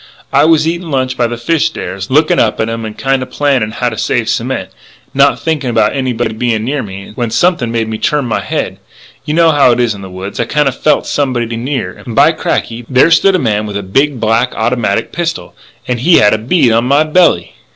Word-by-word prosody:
I - - +5
was 160 -1 +3
eating 170 0 -3
lunch 130 -2 -1
by 120 - +1
the 120 0 -5
fish 160 +6 +1
stairs, 95 - -6
looking 155 +4 +3
up 110 - +1
at 110 - 0
'em 115 0 -4
and 110 -1 -7
kind 135 -1 0
of 130 - -6
planning 135 -7 0
how 120 +2 -2
to 115 - -7
save - - -1
cement, - - -2
and - - -33 0.4
not - - +3
thinking 150 -5 -2
about 110 -1 +1
anybody 125 -4 -2
being 110 -1 -1
near 135 +4 -2
me, 100 -2 -9
when 120 0 -2
something 160 -4 +1
made 115 -1 -1
me 110 0 -4
turn 150 -3 0
my 120 - -1
head.... - - -4 0.5
You 150 - -2
know 165 -1 +4
how 145 -4 +4
it 120 - -2
is 120 -3 +1
in 100 - -10
the 95 - -9
woods.... 95 +2 -7
I 120 - +1
kinda 145 +3 +1
felt 150 +4 +1
somebody 120 -5 -1
near. 130 +3 -3
And, 115 - -9
by 145 +5 +5
cracky! 120 -6 -3
there 130 +5 +4
stood 195 +3 +4
a - - +3
man 110 - -1
with 100 -1 -4
a 100 - -5
big, 135 +8 0
black 115 +3 +1
automatic 110 -3 -1
pistol, 170 -1 -4 0.3
and 125 -1 -1
he 165 +8 +4
had 105 - +5
a 110 - 0
bead 130 +2 +2
on 115 +2 +2
my 140 +4 +3
belly. 155 - +2
125 Hz, 235 wpm, -13 LUFS, 110-150 Hz, 0.5 s, I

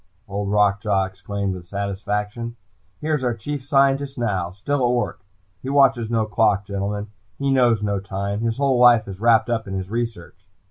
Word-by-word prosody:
Old 100 0 -3
Rock 105 0 +3
Jaw 100 -4 +1
exclaimed 95 +1 -4
with 90 -1 -9
satisfaction. 105 +4 -3 0.5
"Here 155 +1 -1
is 150 -3 0
our 120 -2 0
chief 140 +5 -5
scientist 140 0 +2
now. 95 -7 -1
Still 125 +9 -2
at 120 0 +3
work. 120 - -2 0.4
He 130 - -5
watches 135 -5 +3
no 115 -2 +1
clock, 105 -2 +2
gentlemen. 100 +1 -3 0.3
He 140 0 0
knows 120 -5 +3
no 100 -1 0
time. 100 +1 -3
His 115 -1 -1
whole 135 -3 +2
life 120 -3 +6
is 95 0 -8
wrapped 115 0 +4
up 115 -2 -1
in 95 - -4
his 95 +1 -4
research!" 110 -6 -5
110 Hz, 185 wpm, -22 LUFS, 100-120 Hz, 0.5 s, life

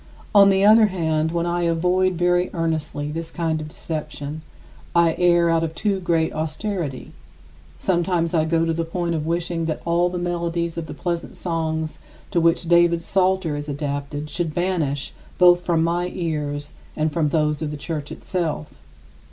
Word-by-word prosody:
50. - - -22
On 200 -1 +8
the 195 0 +3
other 215 +1 +7
hand, 160 -4 0
when 170 0 0
I 175 0 0
avoid 180 +2 +2
very 175 +1 +2
earnestly 155 -3 -2
this 165 +1 -5
kind 160 -2 -1
of 155 - -6
deception, 155 -1 -5 0.5
I 170 -1 +5
err 175 -1 +4
out 165 0 +2
of 165 0 -3
too 200 +2 0
great 165 -3 +1
austerity. 155 -2 -3 0.7
Sometimes 170 - 0
I 160 -2 +3
go 165 0 +2
to 165 - 0
the 165 +1 -1
point 170 +1 -2
of 155 -1 -2
wishing 170 0 -1
that 160 -1 -3
all 170 +1 +2
the 180 - -4
melodies 170 -1 -2
of 165 -1 -4
the 150 - -7
pleasant 170 +1 -4
songs 160 -2 -2 0.3
to 170 - +2
which 165 +1 +2
David's 170 0 +4
Psalter 190 -4 +1
is 145 +1 -5
adapted 145 0 -3
should 165 0 -2
be 175 - +1
banished 155 -7 -1 0.2
both 175 -1 +6
from 170 -2 +1
my 175 +2 0
ears 150 -5 -3 0.2
and 155 0 0
from 160 -2 +1
those 150 -1 +1
of 155 - -2
the 150 - -5
Church 150 0 -5
itself. 165 - -3
165 Hz, 175 wpm, -22 LUFS, 155-175 Hz, 0.7 s, On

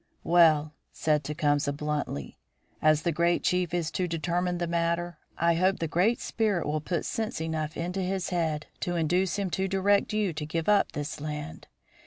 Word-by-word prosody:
"Well," 155 -3 +4 0.2
said 150 -1 +1
Tecumseh, 145 -1 +1
bluntly, 145 - -4 0.4
"as 155 0 +4
the 170 - +1
great 170 +2 +1
chief 180 -2 +1
is 170 -3 -1
to 180 +1 -1
determine 175 +2 -1
the 175 - -1
matter, 170 0 -1 0.2
I 170 +1 +3
hope 185 +3 +2
the 165 - -2
Great 185 +9 +2
Spirit 210 -6 0
will 150 +1 -1
put 170 +2 -2
sense 220 -6 -2
enough 160 -1 -3
into 180 +3 -2
his 185 0 -2
head 160 -4 -1
to 175 - -2
induce 175 +3 +1
him 195 -3 -2
to 190 +2 0
direct 195 +1 +2
you 210 -4 0
to 155 - -4
give 160 +2 -3
up 210 -1 +3
this 145 0 -5
land. 150 - -6
170 Hz, 180 wpm, -28 LUFS, 155-180 Hz, 0.4 s, Well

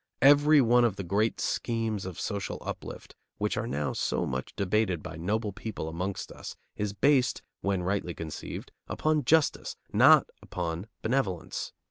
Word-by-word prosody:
Every 145 +2 +7
one 120 0 +5
of 115 -5 +2
the 100 - -5
great 100 +5 0
schemes 115 -4 -1
of 90 - -7
social 100 -2 -3
uplift - - -7 0.2
which 105 0 0
are 110 +2 -2
now 75 -8 -1
so - - 0
much 65 0 -4
debated 100 -4 0
by 85 - -7
noble 105 +6 -1
people 105 -6 -5
amongst 90 +4 -4
us - - -8 0.2
is 105 -1 -2
based, 130 +6 +2 0.2
when 95 -2 0
rightly 95 -2 -1
conceived, 80 -2 -6 0.2
upon 155 -3 0
justice, 160 +3 +2 0.2
not - - +7 0.2
upon 85 +2 -4 0.2
benevolence. 105 -9 -1
100 Hz, 150 wpm, -29 LUFS, 90-120 Hz, 0.2 s, Every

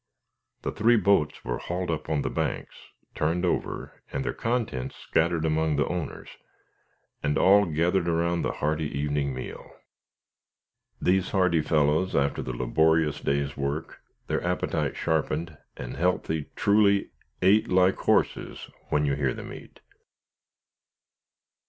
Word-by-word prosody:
The - - -1
three 115 +4 +3
boats 100 -8 +2
were - - -2
hauled 90 0 -3
up 80 0 -4
on 75 -3 0
the - - -1
banks, - - -2 0.4
turned 85 +4 0
over, 90 - -3
and 70 - -3
their - - -1
contents 115 - -2
scattered 80 0 0
among 80 -1 +1
the 70 -1 +2
owners, 90 -3 -4 0.9
and 75 0 0
all 100 +1 +5
gathered 85 +3 +1
around 85 +1 +1
the - - -1
hearty 75 0 -1
evening 70 -1 0
meal. 65 - -8 1.2
These 95 0 +2
hardy 90 -4 +2
fellows 75 +4 +1
after 70 0 +1
the 65 - -4
laborious 75 +5 +2
day's 70 0 -1
work, 70 +3 -4 0.2
their - - -2
appetites - - -1
sharpened, 80 0 -1 0.2
and - - -6
healthy 80 -3 0
truly, 100 -1 +3 0.3
"Ate 105 +4 +5
like 95 +1 +4
horses, - - 0 0.2
when 75 0 +2
you 70 - +1
hear 70 -2 0
them - - -8
eat." - - -13
80 Hz, 135 wpm, -27 LUFS, 75-90 Hz, 1.2 s, all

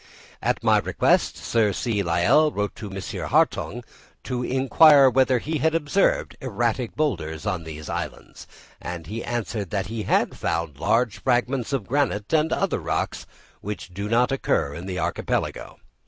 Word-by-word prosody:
At - - -1
my - - +4
request - - +1
Sir 110 -3 +1
C. 110 -2 -1
Lyell 90 - +3
wrote 105 -4 -3
to 105 - -7
M. 95 0 -6 0.3
Hartung - - +1 0.4
to 125 -1 -3
inquire 135 +2 +6
whether 130 0 +3
he 155 +6 -3
had 160 +1 +1
observed 165 +5 +1
erratic 120 -1 -1
boulders 85 - -2
on 90 -5 -2
these 80 -1 -8
islands, - - -6 0.3
and 85 -2 -6
he 110 +9 -5
answered 110 -4 -3
that 100 -2 -2
he 115 - -3
had - - +1
found 80 -4 -3
large 110 +4 +1
fragments 125 +2 0
of 135 -7 -1
granite 120 -4 -1
and 155 0 +3
other - - 0
rocks, - - -3 0.3
which 100 -2 -7
do 100 +3 -4
not 120 +3 +3
occur 100 - 0
in 85 +5 -7
the 90 -1 -4
archipelago. 85 - -2
115 Hz, 155 wpm, -24 LUFS, 95-130 Hz, 0.4 s, inquire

